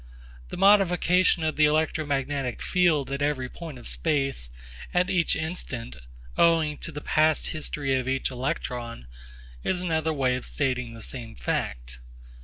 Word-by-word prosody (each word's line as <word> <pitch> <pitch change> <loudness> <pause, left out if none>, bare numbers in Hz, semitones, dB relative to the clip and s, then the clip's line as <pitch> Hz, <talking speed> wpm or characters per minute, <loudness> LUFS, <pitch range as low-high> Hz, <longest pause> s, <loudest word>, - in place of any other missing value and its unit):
The - - -6
modification 185 -3 +4
of 155 0 -1
the 150 - +6
electromagnetic 145 -4 0
field 170 -7 +2
at 140 +1 -2
every 145 -3 0
point 160 0 -9
of 120 - -10
space 135 - -1 0.5
at 180 +1 +3
each 175 -2 +2
instant 155 - -4 0.4
owing 160 -3 +3
to 165 - -4
the 150 -1 -6
past 155 +1 +2
history 145 -3 -2
of 130 - -4
each 135 0 0
electron 125 - -4 0.6
is 180 -1 0
another 160 -2 0
way 130 -4 +1
of 125 - -5
stating 125 -5 -1
the 115 - -8
same 120 -4 -4
fact. - - -3
145 Hz, 145 wpm, -26 LUFS, 130-160 Hz, 0.6 s, the